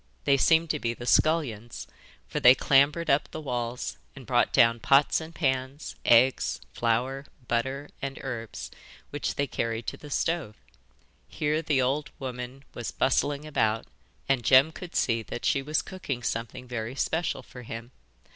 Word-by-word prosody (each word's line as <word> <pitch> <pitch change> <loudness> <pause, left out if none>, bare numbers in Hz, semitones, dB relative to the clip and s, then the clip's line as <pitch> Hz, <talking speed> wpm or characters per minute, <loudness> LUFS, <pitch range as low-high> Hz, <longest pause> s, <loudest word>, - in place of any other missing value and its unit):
They 140 - +4
seemed 160 +4 +4
to 150 - -2
be 115 -2 -2
the 120 - -8
scullions, 125 -7 +1 0.4
for - - -2
they 125 +1 +8
clambered 145 +6 +3
up 140 +2 +2
the - - -6
walls 125 -4 -3 0.2
and - - -11
brought - - +2
down 115 0 +4
pots 140 +7 +4
and 160 +1 -9
pans, 130 -1 -2
eggs, 125 +3 +4
flour, 125 +4 -1 0.2
butter, 130 +4 -1
and 135 0 -4
herbs, 115 -5 -6 0.4
which 145 - -3
they 140 - +1
carried 115 -3 -3
to - - -4
the 150 - -11
stove. 160 -7 -1 0.7
Here 155 +1 -1
the 145 -5 +1
old 140 +4 0
woman 130 0 -6
was 120 - -5
bustling 145 +2 0
about, 110 -7 0 0.4
and 135 -3 +1
Jem 135 +6 +6
could 175 +1 -10
see 115 -2 +1
that 115 - -6
she 140 - +2
was 150 +3 -1
cooking 140 -10 -5
something 115 +2 -4
very 120 0 -4
special 160 -2 -1
for 125 - -11
him. 115 +1 -8
135 Hz, 160 wpm, -27 LUFS, 120-145 Hz, 0.7 s, they